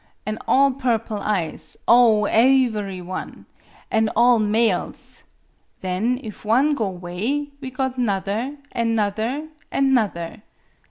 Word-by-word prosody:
An' 215 +1 -3
all 275 +1 +4
purple 230 -5 -1
eyes 195 -6 -2
oh, 230 -3 +6
aevery 220 -6 +2
one! 185 +1 -7 0.5
An' 220 0 +2
all 240 0 +5
males! 215 -2 0 0.6
Then, 200 +7 -1
if 215 -3 -9
one 255 +8 +3
go 220 -8 -1
'way, 190 +11 -3
we 265 - -5
got 260 0 -3
'nother 220 +5 -1
an' 230 -1 0
'nother 225 +8 -1 0.2
an' 270 -1 +2
'nother. 195 -8 -1
225 Hz, 120 wpm, -22 LUFS, 205-255 Hz, 0.6 s, oh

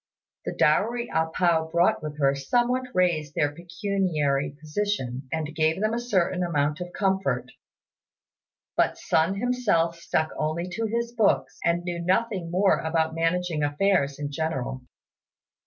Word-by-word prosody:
The - - -3
dowry 230 +10 +2
A 160 0 +2
pao 160 -1 +1
brought 170 +1 +3
with 150 -1 -6
her 140 -2 +3
somewhat 245 - 0
raised 165 -5 +1
their 145 0 +1
pecuniary 170 -5 -1
position, 150 -6 -3
and 155 -2 -2
gave 160 +2 +1
them 215 +2 +1
a 235 - 0
certain 185 -6 0
amount 150 -2 0
of 180 0 -5
comfort; 190 -12 0 1.2
but - - +2
Sun 165 +5 +1
himself 200 -8 +1
stuck 160 -1 0
only 155 +3 -1
to 225 +5 -2
his 235 +2 -2
books, 200 - +1
and 170 +1 +1
knew 175 -1 -3
nothing 185 -2 0 0.3
about 160 0 0
managing 165 0 0
affairs 145 -1 +1
in 145 0 -4
general. 140 -4 -3
170 Hz, 140 wpm, -26 LUFS, 150-195 Hz, 1.2 s, brought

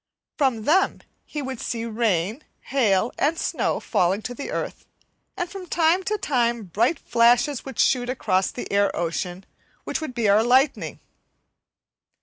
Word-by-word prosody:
From 260 -7 +1
them 360 - +2 0.2
he 295 -2 -5
would 260 -2 -5
see 230 -1 -3
rain, 220 - 0 0.2
hail 225 -5 +1
and 310 +3 +2
snow - - -1
falling 185 +4 0
to 245 - -4
the 260 - -6
earth, - - -5 0.5
and 355 - -1
from 375 0 -9
time 335 +2 +3
to 425 - 0
time 240 - 0
bright 230 - +1
flashes 240 +4 +2
would 265 -3 -8
shoot 245 -1 +2
across 190 -7 +1
the 245 - -7
air 200 0 +3
ocean, 175 +2 -3 0.4
which - - -3
would 270 -6 -5
be 235 -3 +1
our 205 +2 +5
lightning. 260 +4 +2
240 Hz, 150 wpm, -24 LUFS, 210-285 Hz, 0.5 s, our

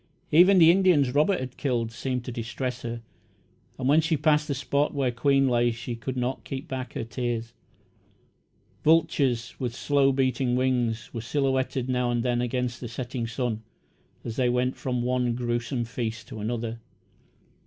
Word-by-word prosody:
Even 185 +5 +7
the 165 -2 +8
Indians 175 -9 +3
Robert 155 +6 +3
had 130 -1 -6
killed 120 -5 -1
seemed 125 +2 -3
to 125 - -4
distress 120 +1 -4
her, 115 -1 -5 0.7
and 130 - -2
when 150 +4 +5
she 160 0 +1
passed 150 +1 +2
the 140 - -1
spot 140 +2 0
where 135 -3 +1
Queen 135 +3 +2
lay 120 -1 +3
she 120 +1 -5
could 130 +3 -5
not 125 +1 -2
keep 135 0 -6
back 130 -2 -5
her - - -3
tears. 115 0 -3 1.3
Vultures, 145 -7 +2
with 120 -3 -3
slow 140 0 +2
beating 130 -1 +1
wings, 125 -3 0
were 115 - -4
silhouetted 130 0 0
now 125 -1 0
and 120 -1 0
then 120 -1 +1
against 125 0 -2
the 120 - -4
setting 120 0 -4
sun, 115 -1 -2 0.6
as 115 -1 -5
they 125 -2 +2
went 125 +1 +1
from 125 -2 -2
one 125 -1 0
grewsome 120 0 -2
feast 115 -2 -4
to 110 - -7
another. 115 +1 -3
125 Hz, 165 wpm, -26 LUFS, 120-135 Hz, 1.3 s, the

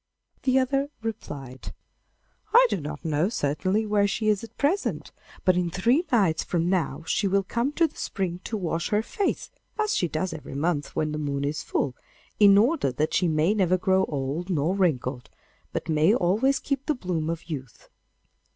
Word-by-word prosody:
The 260 0 +2
other 275 +2 +1
replied, 135 - -6 0.8
'I - - +9
do 175 - -1
not 150 +2 -7
know, 160 +4 +1
certainly, 190 - 0
where 205 -1 +2
she 215 +2 0
is 210 -1 +1
at 230 0 -11
present, 340 +8 0 0.3
but 185 - +5
in 180 -1 +1
three 240 - +2
nights 195 -10 +3
from 170 -1 -1
now 160 -5 -1
she 200 +5 +1
will 195 +1 +2
come 235 +8 -1
to 335 - +3
the 310 - -5
spring 180 -3 -3
to 220 - -2
wash 170 -3 -2
her 210 +1 +1
face, 400 - -2 0.3
as 430 -1 +1
she 175 - +1
does 165 +4 -2
every 145 - -8
month 150 0 -1
when 155 -1 0
the 150 - -3
moon 140 -1 -2
is 150 +2 -2
full, 130 -3 -1 0.4
in 200 -1 +7
order 250 - +3
that 150 +5 -1
she 180 - +2
may 160 +4 +2
never 185 -3 +2
grow 190 0 +2
old 145 +5 -3
nor 165 0 +1
wrinkled, 135 -9 0 0.4
but - - -4
may 160 +6 +4
always 230 +8 +2
keep 275 -1 -3
the 305 - +2
bloom 175 -8 -2
of 165 0 -4
youth. 130 -9 -7
185 Hz, 185 wpm, -26 LUFS, 155-220 Hz, 0.8 s, I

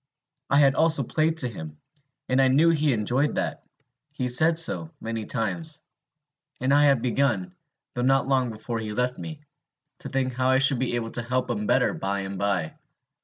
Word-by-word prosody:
I 140 - +3
had 140 -2 +5
also 160 -2 +2
played 160 +6 0
to 130 - +2
him, 80 -9 -8 0.5
and 130 +1 +2
I 135 - +4
knew 150 +6 +4
he 155 -2 +2
enjoyed 125 +6 0
that: - - -2 0.5
he 125 -3 -2
said 160 +6 +4
so, 165 -1 +1
many 115 -1 -5
times. 155 +7 -3 0.8
And 130 +2 +1
I 145 +1 +5
had 135 -5 +3
begun, 140 +9 0 0.4
though 125 - -3
not 135 +1 +2
long 130 -2 +1
before 115 +1 -5
he 110 -1 -5
left 125 +2 -1
me, 155 -2 -7 0.6
to - - -7
think 130 -1 -1
how 130 +1 0
I 130 - +4
should 135 -1 +4
be 125 -2 -1
able 115 -1 -3
to 120 - -2
help 125 +1 -2
him 105 -3 -3
better - - +2
by 100 +1 -3
and 95 0 -6
by. 95 -6 -1
130 Hz, 190 wpm, -25 LUFS, 115-145 Hz, 0.8 s, had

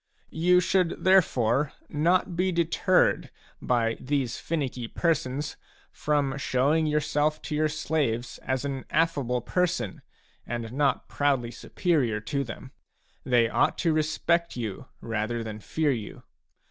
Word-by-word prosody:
You 180 +3 +4
should 180 -1 +1
therefore 145 -8 +3
not 175 +4 +1
be 185 +2 +1
deterred 170 +2 +2 0.3
by 115 -2 +1
these 130 -3 -1
finicky 135 -7 -3
persons 145 -2 -1 0.3
from 145 -2 0
showing 140 +5 +2
yourself 150 0 +1
to 150 - -3
your 155 +1 +2
slaves 140 -6 -1
as 130 +1 -2
an 135 -2 -4
affable 140 -6 +1
person 170 - -1 0.4
and 120 -1 -5
not 140 0 +1
proudly 135 -5 0
superior 125 - 0
to 140 +6 -2
them; 130 +1 -9 0.5
they 120 -3 +3
ought - - +1
to 165 -3 +1
respect 155 +2 +1
you 115 0 -5
rather 115 +1 -2
than 110 -1 -6
fear 155 +6 0
you. 115 -5 -5
140 Hz, 125 wpm, -27 LUFS, 120-160 Hz, 0.5 s, You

